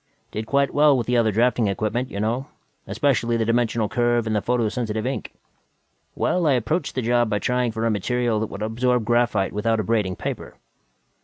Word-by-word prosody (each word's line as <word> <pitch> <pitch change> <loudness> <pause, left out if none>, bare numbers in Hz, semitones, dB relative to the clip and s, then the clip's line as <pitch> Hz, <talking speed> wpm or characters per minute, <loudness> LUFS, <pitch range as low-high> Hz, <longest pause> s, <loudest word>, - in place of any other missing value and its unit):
Did 110 +1 -5
quite 140 +1 +1
well 145 -2 +5
with 120 - -1
the 125 - 0
other 115 -2 +3
drafting 115 +1 +2
equipment, 110 +6 -1
you 100 - -5
know, 120 +6 -1 0.4
especially 120 -5 +1
the 115 - 0
dimensional 115 -1 +1
curve 120 0 +1
and 110 -1 -1
the 105 - +1
photosensitive 115 -2 -1
ink. 135 +1 -3 0.8
Well, 175 -3 +1
I 145 - +4
approached 140 +6 -1
the 130 - -1
job 120 0 +2
by 105 - +1
trying 125 +2 0
for 110 +1 -3
a 115 - +2
material 115 +2 0
that 110 - -2
would 100 +1 -6
absorb 120 +1 0
graphite 120 -4 +1
without 110 +2 0
abrading 105 -3 0
paper." - - -6
115 Hz, 185 wpm, -23 LUFS, 110-125 Hz, 0.8 s, well